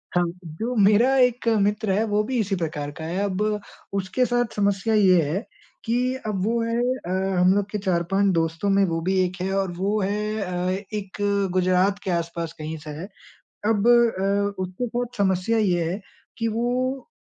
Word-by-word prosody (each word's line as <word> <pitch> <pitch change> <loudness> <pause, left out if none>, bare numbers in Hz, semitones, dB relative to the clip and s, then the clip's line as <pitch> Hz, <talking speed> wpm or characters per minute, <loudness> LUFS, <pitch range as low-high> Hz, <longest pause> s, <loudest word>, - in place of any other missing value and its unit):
हाँ, 175 - +4 0.2
जो 220 +10 -4
मेरा 230 +7 +5
एक 250 -2 +2
मित्र 205 0 +1
है 210 +4 +2
वो 210 +1 +2
भी 255 +3 -2
इसी 200 -2 0
प्रकार 150 -4 -3
का - - -5
है। 175 +3 -3
अब 200 0 -1 0.5
उसके 195 +6 0
साथ 245 -2 0
समस्या 200 +2 +1
ये 185 -5 +5
है 165 +8 -1 0.4
कि 250 +3 +1
अब 195 -3 -1
वो 230 +1 +1
है 230 +1 -1 0.3
अ, - - -5 0.3
हम 180 +1 +5
लोग 200 0 0
के 210 - -1
4-5 190 +1 +1
दोस्तों 165 +4 0
में 195 0 +4
वो 165 -2 -1
भी 190 +2 +1
एक 180 0 -4
है 190 +1 -1
और 190 -2 0
वो 205 +3 0
है 210 +2 -1
अ, 180 -1 -1 0.2
एक 200 -2 -5 0.4
गुजरात 185 +2 +2
के 190 - -2
आस-पास 170 -1 -2
कहीं 155 +1 -5
से 155 0 -10
है। 180 - -5 0.6
अब 220 +1 +2
अ, 200 -4 +3
उसके 185 +7 -4
साथ 245 0 -4
समस्या 190 +3 +1
ये 180 -5 +2
है 195 - -3 0.4
कि 230 -1 -1
वो 250 +4 -1
200 Hz, 185 wpm, -24 LUFS, 180-225 Hz, 0.6 s, मेरा